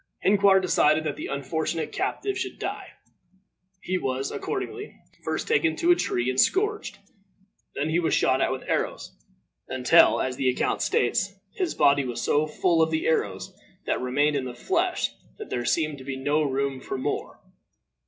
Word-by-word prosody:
Hinquar 200 -1 +5
decided 155 -4 +3
that 150 -2 -2
the - - -6
unfortunate 160 +4 -2
captive 400 -1 -2
should 380 0 -4
die. - - -5 1.0
He 185 0 -1
was, 135 -1 -2
accordingly, 415 +1 -5 0.3
first - - -3
taken 355 -8 +2
to 345 +1 +3
a - - +7
tree 120 - -1
and 130 0 0
scourged. 420 +2 0 0.8
Then 140 +2 -1
he 165 +2 +2
was 170 - 0
shot 130 +1 +2
at - - +2
with 130 - -4
arrows, - - -3 0.5
until, 125 -1 +5
as 130 -1 -2
the 130 - +2
account 125 - 0
states, 190 +10 +1 0.2
his 365 -3 -2
body 140 0 +4
was 120 -2 -4
so 150 +5 +1
full 165 +2 +1
of 160 - +3
the 160 0 -1
arrows 95 -12 -1 0.3
that - - -1
remained 145 +4 +1
in 135 -2 -1
the 125 -1 -6
flesh 120 - 0 0.3
that - - -9
there 120 -1 -2
seemed 155 +2 0
to - - -10
be 135 0 -5
no 145 +3 +1
room 135 -2 -1
for 135 - -4
more. 130 - -4
150 Hz, 175 wpm, -26 LUFS, 130-185 Hz, 1.0 s, a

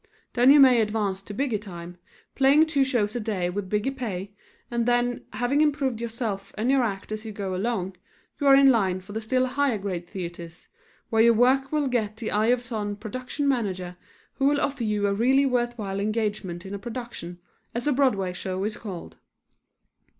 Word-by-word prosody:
Then 245 +1 +5
you 290 +1 +8
may 255 -4 +7
advance 210 -3 -1
to 195 - -10
bigger 230 0 -1
time, 175 -3 -9 0.3
playing 280 +3 +5
two 295 -4 +2
shows 240 -5 0
a - - 0
day 200 -5 -2
with 195 0 -4
bigger 210 +6 0
pay, 205 -7 -5 0.4
and 235 0 0
then, 245 0 +1
having 260 +4 +1
improved 275 -6 +1
yourself 225 -4 -4
and 230 +5 +1
your 275 -1 +4
act 205 -4 -3
as 215 0 -4
you 220 - -6
go 200 -2 -4
along, 190 -2 -2 0.4
you 285 - +1
are 275 - +8
in 275 0 +7
line 190 -6 +1
for 200 +2 -11
the 220 - -3
still 255 +4 +1
higher 260 -2 0
grade 185 -4 -4
theatres, 170 -2 -8 0.4
where 225 -1 +4
your 230 0 +6
work 265 +3 +3
will 300 -2 +1
get 220 -4 -1
the 220 -1 -4
eye 215 +2 +2
of 245 0 +2
some 215 -4 -3
production 250 +7 -4
manager 190 -9 -1 0.4
who 270 - +1
will 285 0 +3
offer 275 -3 -1
you 210 -2 0
a 200 - +2
really 260 +6 +3
worthwhile 240 -6 -1
engagement 205 -4 -2
in 190 - -7
a 200 - -4
production, 225 -6 -7 0.4
as 240 - -2
a 295 - +3
Broadway 210 -9 +1
show 185 +1 -3
is 215 +1 -3
called. 190 -6 -8
220 Hz, 195 wpm, -25 LUFS, 195-255 Hz, 0.4 s, you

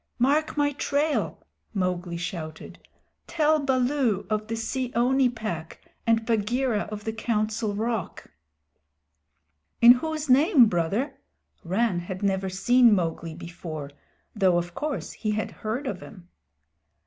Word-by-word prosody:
"Mark 290 +5 +1
my 290 0 +2
trail!" 290 +2 -1 0.3
Mowgli 180 -2 -1
shouted. 170 -3 -6 0.5
"Tell 310 -2 +2
Baloo 255 -5 +1
of 215 0 -1
the 225 - -2
Seeonee 250 +2 +1
Pack 215 -9 -5 0.3
and 225 -1 +3
Bagheera 230 0 0
of 210 -1 -6
the 220 - -3
Council 215 -1 -1
Rock." 225 0 -3 1.5
"In 235 +1 +9
whose 310 +4 0
name, 275 - +6
Brother?" 215 - -1 0.4
Rann 190 +1 +1
had 185 +3 -6
never 190 -1 0
seen 235 +4 +4
Mowgli 165 -2 -2
before, 165 -4 -7 0.4
though 190 -4 +3
of 175 0 -3
course 300 - -3
he 215 -2 -2
had 215 0 -2
heard 230 +7 -3
of 200 -8 -4
him. 180 -4 -12
220 Hz, 125 wpm, -26 LUFS, 185-255 Hz, 1.5 s, In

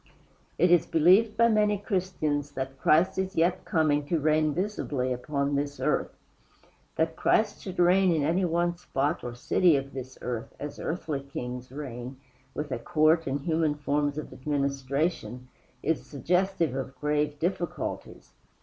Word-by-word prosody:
It 175 +1 +4
is 175 -2 +5
believed 190 +7 +4
by 230 0 +6
many 210 -2 +3
Christians 175 -8 -2
that 135 0 -5
Christ 180 +5 +3
is 190 0 -2
yet 175 +3 +1
coming 150 -3 +2
to 165 +1 +1
reign 155 0 +2
visibly 145 -7 -2
upon 140 +3 -2
this 140 0 -2
earth. - - -1 0.8
That 160 0 0
Christ 215 +4 +1
should 190 -2 -7
reign 180 +1 +4
in 160 -3 +1
any 170 +6 +1
one 175 0 +1
spot 150 -2 -1
or 120 -1 -5
city 165 +6 +3
of 135 0 -3
this 130 -1 -7
earth, 120 -2 -4
as 145 0 -6
earthly 160 -4 -3
kings 125 -3 -7
reign, 130 -2 -7 0.4
with 150 -1 -4
a 125 - -2
court 155 +5 +2
and 135 +1 -1
human 160 -1 +1
forms 145 0 -1
of 155 - -6
administration, 140 -1 -2 0.3
is 160 0 0
suggestive 170 +2 0
of 135 0 -4
grave 150 0 0
difficulties. 175 +1 -4
150 Hz, 150 wpm, -28 LUFS, 140-175 Hz, 0.8 s, by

